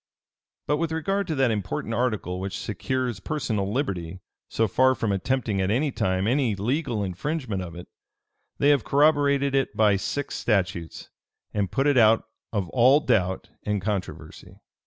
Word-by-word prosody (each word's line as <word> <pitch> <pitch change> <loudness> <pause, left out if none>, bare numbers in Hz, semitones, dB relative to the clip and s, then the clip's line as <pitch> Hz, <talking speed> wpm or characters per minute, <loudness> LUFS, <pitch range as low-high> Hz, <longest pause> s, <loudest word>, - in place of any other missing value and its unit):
But 150 - +1
with 165 0 -1
regard 195 +5 -1
to 160 - -1
that 135 -3 +2
important 105 +2 -3
article 110 -7 -1
which 95 -2 -4
secures 130 -5 -3
personal 110 -7 -2
liberty, 95 - -3 0.3
so 115 - +1
far 130 +6 +3
from 110 -4 -1
attempting 105 0 -1
at 95 - 0
any 135 +7 +1
time 95 -4 0
any 125 -2 +1
legal 120 +1 -1
infringement 110 - -3
of 85 -2 -7
it, 90 - -9 0.7
they 145 - +3
have 140 -5 +4
corroborated 140 -1 +3
it 135 -1 0
by 105 -2 +4
six 145 +8 -3
statutes, 95 -6 -2 0.4
and 100 -4 -1
put 135 +1 0
it 145 -3 +4
out 110 0 +5 0.3
of 100 -5 -1
all 130 +3 +5
doubt 95 -10 0
and 105 -1 -1
controversy. 100 -1 -5
115 Hz, 155 wpm, -25 LUFS, 95-140 Hz, 0.7 s, out